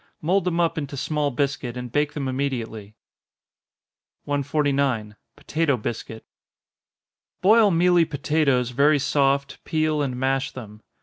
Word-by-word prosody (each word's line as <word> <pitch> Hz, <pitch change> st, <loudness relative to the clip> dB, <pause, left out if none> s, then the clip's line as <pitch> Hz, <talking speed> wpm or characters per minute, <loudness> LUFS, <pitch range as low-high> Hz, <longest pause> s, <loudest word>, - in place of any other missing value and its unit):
Mould 180 Hz, +4 st, +1 dB
them 175 Hz, -1 st, 0 dB
up 165 Hz, -1 st, +1 dB
into 140 Hz, -1 st, -6 dB
small 150 Hz, +1 st, -1 dB
biscuit, 135 Hz, -2 st, -2 dB
and 125 Hz, -1 st, -6 dB
bake 145 Hz, +1 st, 0 dB
them 140 Hz, -3 st, -3 dB
immediately. 120 Hz, -6 st, -4 dB, 1.3 s
149. 140 Hz, -6 st, 0 dB, 0.2 s
Potato 155 Hz, -4 st, 0 dB
Biscuit. 110 Hz, 0 st, -6 dB, 1.2 s
Boil 215 Hz, +2 st, +6 dB
mealy 175 Hz, -1 st, +4 dB
potatoes 145 Hz, -4 st, 0 dB
very 145 Hz, +4 st, +4 dB
soft, 140 Hz, 0 st, 0 dB
peel 155 Hz, -1 st, 0 dB
and 130 Hz, -3 st, -2 dB
mash 135 Hz, +1 st, 0 dB
them. 105 Hz, -4 st, -10 dB
140 Hz, 120 wpm, -23 LUFS, 130-155 Hz, 1.3 s, Boil